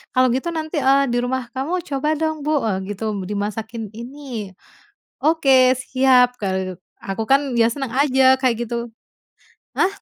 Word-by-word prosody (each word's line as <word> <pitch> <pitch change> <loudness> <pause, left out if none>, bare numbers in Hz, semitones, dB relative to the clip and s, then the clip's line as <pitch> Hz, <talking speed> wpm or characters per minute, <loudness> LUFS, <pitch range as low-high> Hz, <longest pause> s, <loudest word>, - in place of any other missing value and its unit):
kalau 255 0 +5
gitu 305 +6 -2
nanti, 315 0 -3
eee, 275 +1 +4
di 240 - 0
rumah 250 -1 -2
kamu 330 +7 -2
coba 280 +2 -1
dong 315 -2 -2
Bu," 300 -4 +1
e - - +1 0.2
gitu, 220 +2 -3
"dimasakin 215 +2 -4
ini", 240 -4 -7 0.7
"Oke, 270 -5 +5
siap," 255 -1 +3
kaluk 190 -2 -2 0.2
aku 195 +3 -4
kan 275 -2 +3
ya 230 - +5
senang 270 -5 -5
aja, 265 -2 +5
kayak 255 -3 +2
gitu. 235 0 -4 0.8
Hah? - - +3
255 Hz, 150 wpm, -21 LUFS, 225-275 Hz, 0.8 s, kalau